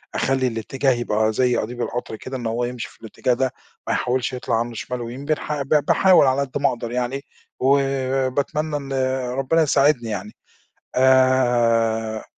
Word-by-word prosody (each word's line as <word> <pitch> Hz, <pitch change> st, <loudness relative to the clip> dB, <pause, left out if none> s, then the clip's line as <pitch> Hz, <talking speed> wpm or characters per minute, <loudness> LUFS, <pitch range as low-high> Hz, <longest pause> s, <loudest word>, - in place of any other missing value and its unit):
أخلي 130 Hz, 0 st, +1 dB
الاتجاه 130 Hz, +4 st, -1 dB
يبقى 110 Hz, -2 st, 0 dB
زي 125 Hz, +1 st, +2 dB
قضيب 120 Hz, +3 st, -4 dB
القطر 120 Hz, -2 st, -4 dB
كده، 130 Hz, +4 st, -6 dB
إن 120 Hz, -, -7 dB
هو 120 Hz, +2 st, -1 dB
يمشي 120 Hz, -1 st, -5 dB
في -, -, -22 dB
الاتجاه 120 Hz, +2 st, -1 dB
ده، 130 Hz, +1 st, -1 dB, 0.3 s
ما -, -, +1 dB
يحاولش 125 Hz, 0 st, -1 dB
يطلع 120 Hz, -2 st, -1 dB
عنه 120 Hz, 0 st, -3 dB
شمال 120 Hz, +4 st, -5 dB
ويمين، 125 Hz, +4 st, -7 dB
بنح 150 Hz, -1 st, -2 dB
ب 135 Hz, -, -5 dB, 0.2 s
باحاول 185 Hz, -5 st, +5 dB
على 130 Hz, +2 st, +2 dB
قد 140 Hz, -1 st, -3 dB
ما 140 Hz, -, +4 dB
أقدر 120 Hz, -1 st, -5 dB
يعني، 125 Hz, +2 st, -2 dB, 0.4 s
وباتمنى 135 Hz, +2 st, 0 dB
إن 140 Hz, -1 st, -6 dB, 0.4 s
ربنا 135 Hz, +5 st, +1 dB
يساعدني 140 Hz, -5 st, +2 dB
يعني 105 Hz, 0 st, -4 dB, 0.6 s
آآ 120 Hz, -4 st, +3 dB
130 Hz, 160 wpm, -22 LUFS, 120-135 Hz, 0.6 s, باحاول